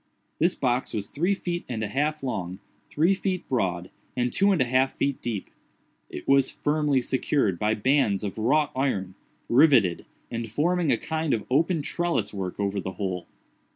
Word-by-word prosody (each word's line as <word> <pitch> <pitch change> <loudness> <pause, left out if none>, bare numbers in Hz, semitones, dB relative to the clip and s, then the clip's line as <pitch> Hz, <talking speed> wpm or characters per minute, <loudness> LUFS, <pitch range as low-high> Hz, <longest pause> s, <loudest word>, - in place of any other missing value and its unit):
This 170 +3 +3
box 125 -1 -1
was 105 -2 -2
three 175 - 0
feet 175 -2 -3
and 110 -3 -3
a - - -1
half 150 +6 -1
long, 95 -8 -3 0.3
three 165 +6 +3
feet 190 -2 -2
broad, 90 -8 -1 0.3
and 125 -1 0
two 200 +1 +3
and 185 - +2
a 130 - +3
half 130 +2 +2
feet 140 -1 -1
deep. 110 -5 -4 0.6
It 75 - -8
was 135 -1 +4
firmly 145 -3 +1
secured 125 - 0
by 105 +1 +1
bands 110 -4 +2
of 105 +1 -4
wrought 145 +7 +2
iron, 100 -9 -1 0.3
riveted, 120 - +4 0.2
and 115 -1 -4
forming 165 +6 +1
a - - +3
kind 160 -2 -1
of 110 - -5
open 160 +3 +2
trelliswork 105 - -2
over 100 0 -1
the 95 0 -5
whole. 90 -2 -4
130 Hz, 170 wpm, -26 LUFS, 105-155 Hz, 0.6 s, was